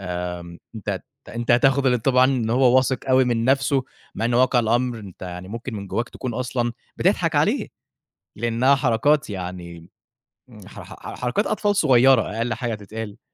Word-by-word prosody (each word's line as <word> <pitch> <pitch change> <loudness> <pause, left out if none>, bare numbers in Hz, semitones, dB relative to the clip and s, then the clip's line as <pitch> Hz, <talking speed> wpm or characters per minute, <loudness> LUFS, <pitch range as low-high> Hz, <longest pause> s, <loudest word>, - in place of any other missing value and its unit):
آمم 90 -2 -5 0.2
أنت 110 - -4 0.3
أنت 120 +1 -4
هتاخُد 135 +3 +4
الانطباع 125 +1 +3
إن 130 -4 0
هو 125 +1 +4
واثق 130 0 +2
أوي 130 0 +5
من 120 -2 0
نَفْسه، 135 +1 +2 0.3
مع - - -3
إنه 120 +1 +2
واقع 130 -1 +3
الأمر 120 +1 +1
أنت 100 -4 -12
يعني 90 0 -7
ممكن 115 +3 -6
من 100 -2 -6
جوّاك 115 +5 -2
تكون 125 -3 -6
أصلًا 120 -1 -2 0.2
بتضحك - - +1
عليه، - - +1 0.7
لإنّها 120 +5 +2
حركات 135 +2 +1
يعني 90 -3 -7 0.6
ن - - -14
حـر - - -10
حـر - - -11
حـر - - -8
حركات 125 - -1
أطفال 205 -1 0
صغيرة 130 - +5 0.2
أقَل 115 0 -1
حاجة 120 -1 -3
تتقال. 105 +1 -8
120 Hz, 165 wpm, -22 LUFS, 105-130 Hz, 0.7 s, أوي